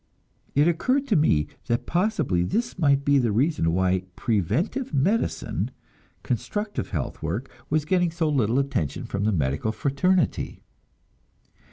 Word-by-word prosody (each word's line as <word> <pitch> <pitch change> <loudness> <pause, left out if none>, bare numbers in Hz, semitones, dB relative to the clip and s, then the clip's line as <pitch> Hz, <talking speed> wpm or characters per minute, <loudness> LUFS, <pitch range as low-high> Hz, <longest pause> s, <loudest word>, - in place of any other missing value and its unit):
It 145 +3 +5
occurred 255 - +1
to 210 - +3
me 80 - +3 0.2
that 120 +1 0
possibly 170 - +1
this 230 - -1
might 140 -3 +3
be 140 -1 +4
the 120 -4 +1
reason 115 - +2
why 95 +1 +2
"preventive 145 - -1
medicine," 195 +12 0 0.5
constructive 210 0 -3
health 75 -8 -4
work, 95 +12 -3 0.2
was 155 0 +1
getting 175 +1 +2
so 165 -1 -1
little 125 -5 +2
attention 135 - -1
from 100 +1 -2
the 110 - +3
medical 75 +4 0
fraternity. 145 - 0
140 Hz, 135 wpm, -25 LUFS, -, 0.5 s, It